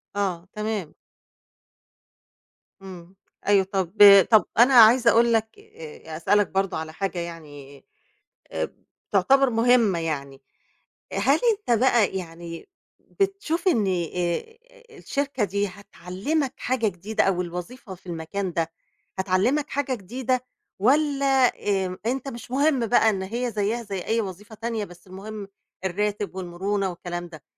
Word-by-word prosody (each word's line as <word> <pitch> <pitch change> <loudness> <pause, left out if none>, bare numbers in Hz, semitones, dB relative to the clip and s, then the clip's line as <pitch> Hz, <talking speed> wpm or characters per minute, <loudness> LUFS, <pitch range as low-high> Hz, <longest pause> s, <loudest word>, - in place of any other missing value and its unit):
آه، 185 -3 -2
تمام. 210 -6 -4 1.9
إمم، 185 -1 -11 0.3
أيوه 200 -2 +5
طَب 190 -3 -1 0.4
طَب 220 - +6
أنا 250 +3 +6
عايزة 235 +1 +7
أقول 235 0 +4
لَك 220 0 -1
آآ، 155 0 -10
أسألَك 205 +4 +2
برضه 195 -2 -1
على 160 0 -6
حاجة 190 -1 -3
يعني، 145 -5 -9 0.7
آآ، - - -3 0.4
تعتبر 270 -1 +4
مهمّة 225 -5 +3
يعني، 140 -4 -4 0.7
هل 260 +10 +2
أنت 320 - 0
بقى 235 -7 +3
يعني 170 - -8 0.3
بتشوف 390 -3 -2
إن 215 - +2
آآ 180 - -2 0.4
الشركة 275 -5 -2
دي 200 +1 -1
هتعلمَك 200 - -4
حاجة 245 -3 0
جديدة 200 +4 -1
أو 185 -2 +1
الوظيفة 180 +5 -7
في 180 - -25
المكان 175 +2 -4
ده 165 -1 -1 0.5
هتعلمَك 200 +10 +1
حاجة 270 -2 -1
جديدة؟ 250 +5 -3 0.3
والّا، 280 +4 +2 0.6
آآ، 185 +1 -6
أنت 260 +3 -2
مش 240 0 -10
مهم 275 -3 +2
بقى 225 -1 +4
إن 190 -1 -3
هي 235 +4 -3
زيها 220 +3 -1
زي 200 -3 -5
أي 225 +1 +1
وظيفة 205 +2 -8
تانية 225 -1 -3
بس 175 +1 -16
المهم 200 +2 -8 0.4
الراتب 205 +1 -2
والمرونة 190 +2 -2
والكلام 175 0 -6
ده؟ 155 -4 -13
200 Hz, 130 wpm, -24 LUFS, 180-240 Hz, 1.9 s, عايزة